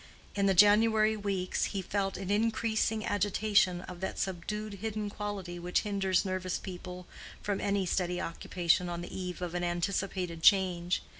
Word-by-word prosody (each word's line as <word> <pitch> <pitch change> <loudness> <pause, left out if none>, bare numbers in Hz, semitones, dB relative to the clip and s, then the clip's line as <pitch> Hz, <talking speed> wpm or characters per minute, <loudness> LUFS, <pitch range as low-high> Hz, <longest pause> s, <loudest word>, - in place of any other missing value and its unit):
In 200 -1 +1
the 195 - +3
January 215 +2 +5
weeks, 195 -3 -1
he 195 -2 -3
felt 195 0 -1
an 195 0 -4
increasing 220 0 +1
agitation 205 -2 +2
of 180 -1 -9
that 190 - -4
subdued 200 +3 -3
hidden 215 -2 -3
quality 200 -4 -5
which 175 +1 0
hinders 195 -2 +1
nervous 185 -1 -2
people 180 -1 -8 0.4
from 205 -1 -1
any 200 -1 +1
steady 180 0 0
occupation 175 +1 0
on 170 0 -4
the 175 - -8
eve 180 -1 -4
of 175 -1 -4
an 175 0 -2
anticipated 175 0 -2
change. 180 -2 +3
190 Hz, 155 wpm, -31 LUFS, 180-205 Hz, 0.4 s, January